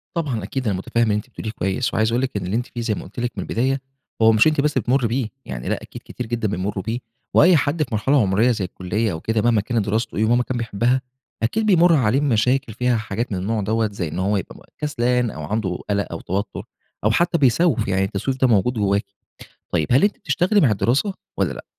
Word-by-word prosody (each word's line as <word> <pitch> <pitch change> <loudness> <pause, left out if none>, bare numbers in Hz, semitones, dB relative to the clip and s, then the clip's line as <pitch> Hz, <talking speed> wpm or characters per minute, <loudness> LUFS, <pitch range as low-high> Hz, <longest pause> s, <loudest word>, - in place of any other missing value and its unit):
طبعًا، 135 - -2
أكيد 130 +4 -3
أنا 100 - 0
متفهم 115 +5 0
اللي 110 -2 +2
أنتِ 105 +4 -4
بتقوليه 110 -3 -6
كويس، 95 +4 -1
وعايز 110 0 +2
أقول 120 - +1
لِك 130 -5 -2
إن 90 - -4
اللي 95 +5 -2
أنتِ 120 - 0
فيه، 120 - -6
زي 115 -2 0
ما - - -6
قلت 105 - -10
لِك 120 0 -1
من - - -2
البداية، 130 +3 0 0.4
هو 110 0 +7
مش 110 +7 +5
أنتِ 155 -2 +2
بس 150 0 +1
اللي - - +1
بتمرّي 125 -1 +2
بِه، 115 -1 -1 0.2
يعني - - -5
لأ، - - -1
أكيد - - -10
كتير 125 - -6
جدًا 115 -2 -1
بيمروا 95 0 -3
بِه، 115 +5 -2 0.3
وأي 180 +1 +6
حد 150 +2 +1
في 130 - -9
مرحلة 135 +6 +2
عمرية 105 +5 +3
زي 105 -5 -1
الكلّية 95 +4 -2
أو 80 - -4
كده، 110 +4 0
مهما 115 -2 +3
كانت 115 -1 -1
دراسته 110 +2 -1
إيه، 110 - +3
ومهما 120 +2 +3
كان 130 - -3
بيحبها، 120 +3 0 0.4
أكيد 215 - +1
بيمر 175 -4 +5
عليه 130 -1 +2
مشاكل 125 -2 +1
فيها 125 +1 +1
حاجات 110 +2 -3
من 95 - -1
النوع 105 +3 -1
دوّة، 110 +2 0
زي 90 -4 -3
إن 80 +4 -5
هوَ 100 +2 +1
يبقى 95 - -8
كسلان، 125 -5 0
أو 80 - -7
عنده 95 +1 -2
قلق 100 0 0
أو 85 - -4
توتر، 100 +4 -3 0.4
أو 110 - +3
حتى 170 +6 +2
بيسوّف، 135 - +3
يعني 95 0 +1
التسويف 100 +7 -2
ده 130 - +5
موجود 115 +2 +3
جواكِ. 100 -2 +1 0.7
طيب، 80 -3 +1
هل 130 - +5
أنتِ 205 0 +2
بتشتغلي 195 +1 +1
مع 125 - +4
الدراسة، 125 - +1 0.2
والّا - - 0
لأ؟ - - -9
115 Hz, 235 wpm, -21 LUFS, 100-130 Hz, 0.7 s, هو